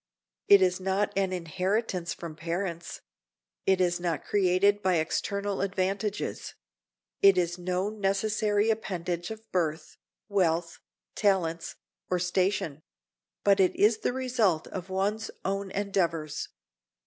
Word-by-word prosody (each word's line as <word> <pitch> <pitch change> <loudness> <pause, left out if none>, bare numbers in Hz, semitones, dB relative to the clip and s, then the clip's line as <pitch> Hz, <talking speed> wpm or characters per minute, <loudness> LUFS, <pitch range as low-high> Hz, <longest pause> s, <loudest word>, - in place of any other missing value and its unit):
It 200 -1 +8
is 185 0 +2
not 195 +2 0
an 195 -1 +1
inheritance 185 +1 -1
from 165 -2 -6
parents; 170 +1 -4 0.7
it 190 -1 +4
is 175 -1 +2
not 170 -3 -2
created 200 +1 +3
by 185 -2 +2
external 200 +5 -1
advantages; 195 +1 -2 0.7
it 195 -1 +7
is 175 0 0
no 180 +2 -1
necessary 210 +1 +1
appendage 175 -5 -3
of 220 0 -9
birth, 160 -3 -2 0.3
wealth, 170 -4 0 0.3
talents, 170 -5 0 0.3
or 180 - +2
station; 180 -4 0 0.6
but 200 -1 +4
it 185 -1 +3
is 215 +1 +4
the - - 0
result 245 -10 +1
of 185 0 -6
one's 205 +4 -1 0.2
own 195 0 -1
endeavors. 170 -7 -1
190 Hz, 120 wpm, -28 LUFS, 175-200 Hz, 0.7 s, It